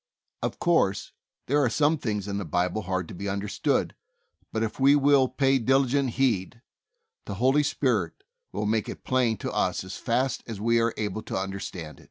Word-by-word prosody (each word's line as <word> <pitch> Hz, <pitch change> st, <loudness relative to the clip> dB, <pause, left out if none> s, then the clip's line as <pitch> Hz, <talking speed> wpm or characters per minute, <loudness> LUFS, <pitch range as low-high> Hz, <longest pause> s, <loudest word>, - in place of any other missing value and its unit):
Of -, -, -2 dB
course, 165 Hz, -, +1 dB, 0.3 s
there 145 Hz, +2 st, +2 dB
are 125 Hz, -, +3 dB
some 150 Hz, +5 st, +2 dB
things 105 Hz, -5 st, -2 dB
in 100 Hz, 0 st, -2 dB
the -, -, -3 dB
Bible 90 Hz, +5 st, -1 dB
hard 95 Hz, -2 st, -2 dB
to -, -, -8 dB
be 100 Hz, +3 st, -4 dB
understood, 100 Hz, +1 st, -1 dB, 0.6 s
but 110 Hz, -, -1 dB
if 110 Hz, -, -4 dB
we 140 Hz, +2 st, +6 dB
will 140 Hz, -2 st, +4 dB
pay 135 Hz, 0 st, +2 dB
diligent 135 Hz, +1 st, +2 dB
heed 115 Hz, -3 st, 0 dB, 0.6 s
the -, -, -5 dB
Holy 130 Hz, +7 st, +3 dB
Spirit 150 Hz, -, -1 dB, 0.3 s
will -, -, -3 dB
make 110 Hz, 0 st, 0 dB
it -, -, -8 dB
plain 125 Hz, -4 st, +1 dB
to -, -, -4 dB
us -, -, 0 dB
as 95 Hz, +1 st, -7 dB
fast 130 Hz, +2 st, 0 dB
as 110 Hz, -4 st, -6 dB
we 115 Hz, +2 st, +2 dB
are 115 Hz, 0 st, 0 dB
able 105 Hz, 0 st, -2 dB
to -, -, -4 dB
under 95 Hz, +1 st, -3 dB
stand. 80 Hz, -5 st, -7 dB
115 Hz, 190 wpm, -26 LUFS, 100-135 Hz, 0.6 s, we